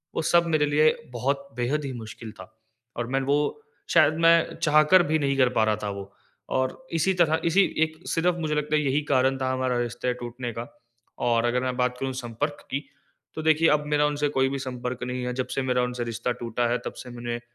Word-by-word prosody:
वो - - 0
सब 170 0 +5
मेरे 155 -2 +2
लिए 150 +2 +4 0.2
बहुत 140 +3 -1
बेहद 135 +5 0
ही 135 - -3
मुश्किल 110 -1 -8
था - - -11 0.5
और 120 0 -2
मैं 135 +2 0
वो 140 +2 +2 0.5
शायद 150 - +6
मैं 165 0 +4
चाहकर 155 +4 +5
भी 155 +1 +1
नहीं 140 -2 0
कर 130 -2 +4
पा 110 - +5
रहा 110 - +2
था 105 - -1
वो। 100 0 -7 0.4
और 130 - -2
इसी 165 +4 +2
तरह 160 -1 +3
इसी 180 +4 +4 0.2
1 160 0 -11
सिर्फ़ 175 +1 +1
मुझे 155 -2 -1
लगता 150 +1 0
है 150 - +3
यही 140 +1 +1
कारण 130 0 +3
था 130 0 0
हमारा 130 -1 0
रिश्ता 120 +1 -2
टूटने 120 0 -5
का 115 +2 -6 0.6
और 115 0 +2
अगर 125 +1 +1
मैं 130 -1 -1
बात 125 0 0
करूँ 135 -1 -2
संपर्क 145 +6 -4
की 140 +1 -3 0.5
तो 155 - -3
देखिए 160 +1 +4
अब 150 0 +2
मेरा 150 0 +2
उनसे 145 0 0
कोई 135 -1 +1
भी 140 - -3
संपर्क 125 -1 -5
नहीं 125 0 -3
है 125 - -2
जब 130 0 -2
से 135 - 0
मेरा 125 -1 +1
उनसे 125 0 -2
रिश्ता 120 +1 -2
टूटा 120 0 -1
है 120 - +1
तब - - -4
से 125 - -9
मैंने 120 -1 -5
130 Hz, 220 wpm, -25 LUFS, 125-150 Hz, 0.6 s, शायद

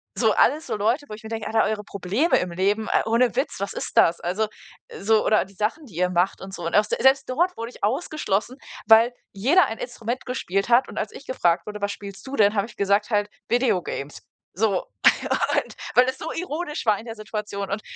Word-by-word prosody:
So - - +3
alles 310 +2 +3
so - - -2
Leute, 230 +8 +1
wo - - -7
ich 210 - -9
mir 220 - -8
denke, 225 -2 -4
Alter, 220 0 +2
eure 215 -1 -2
Probleme 200 - +1
im 180 - -3
Leben, 200 +5 0
äh, - - +3
ohne 235 +1 +2
Witz, - - -1
was 200 - -3
ist - - -6
das? 170 +1 +5
Also, 190 +5 0 0.4
äh, - - -10
so, 220 +2 +3
oder 215 -3 +3
die 195 - -18
Sachen, 220 - -2
die 195 -10 -15
ihr 180 +1 +1
macht 180 +1 0
und 190 0 -9
so. 175 - -6
Und 165 - -1
aus 210 +1 +4
der - - -1
selbst 265 0 +4
dort 345 +8 +1
wurde 230 +1 -5
ich - - -17
ausgeschlossen, 255 - -1 0.3
weil 230 +2 +6 0.2
jeder 280 - +4
ein 225 - -5
Instrument 240 0 -5
gespielt 195 -5 -2
hat 240 +2 +4
und - - -10
als - - -2
ich 280 - -12
gefragt 175 -9 +1
wurde: 210 0 -6
„Was 205 0 0
spielst 200 -2 -9
du 275 - -4
denn?“ 205 -2 +4
Habe 200 - +1
ich 225 - -16
gesagt 200 +3 +1
halt: 205 0 +1 0.2
„Video 240 -6 +2
games!“ 140 +1 -6 0.3
So, 200 -1 0 0.7
und - - -1 0.2
weil 250 - +7
es 260 - -4
so 320 - -5
ironisch 325 -2 -4
war 210 -2 +4
in 225 - -11
der 225 -1 -7
Situation 210 -2 -5
und 205 - -2
215 Hz, 235 wpm, -24 LUFS, 200-250 Hz, 0.7 s, weil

